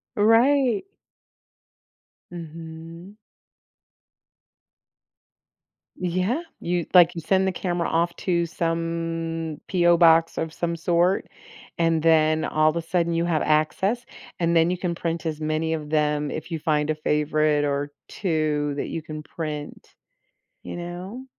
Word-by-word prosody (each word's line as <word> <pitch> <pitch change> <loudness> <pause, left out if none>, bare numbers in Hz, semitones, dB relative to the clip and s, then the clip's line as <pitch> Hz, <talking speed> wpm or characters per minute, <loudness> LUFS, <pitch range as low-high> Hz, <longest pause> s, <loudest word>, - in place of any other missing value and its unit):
Right. 235 - +4 1.5
Mhm. 165 +2 -9 2.8
Yeah. 185 - -1 0.2
You 175 -1 -1
like, 175 -2 +7
you 165 - -4
send 190 +3 +2
the - - +1
camera 175 -2 -2
off 170 +1 0
to 170 -2 0
some 165 -1 -3
P.O. 175 -2 +4
Box 165 -1 +5
of 160 0 -3
some 170 -1 -2
sort, 175 +3 +1 0.5
and 165 -2 +2
then 155 -1 +3
all 155 0 +3
of 155 - -2
a 170 - -1
sudden 170 0 0
you 165 +1 +1
have 165 -3 +1
access, 190 +10 +1 0.3
and 170 -1 +1
then 165 +1 +4
you 180 - -1
can 175 -1 -2
print 165 -1 -3
as 155 -1 -3
many 155 +1 -1
of 150 -2 -4
them 150 -1 +1
if 155 +3 -6
you 165 - -2
find 150 -1 0
a 155 - +1
favorite 150 0 +1
or 145 0 -2 0.2
2 155 -5 -1
that - - -2
you 165 - -4
can 155 -1 -8
print, 150 -2 -6 0.7
you - - -7
know. 180 +8 -7
165 Hz, 135 wpm, -24 LUFS, 155-175 Hz, 2.8 s, like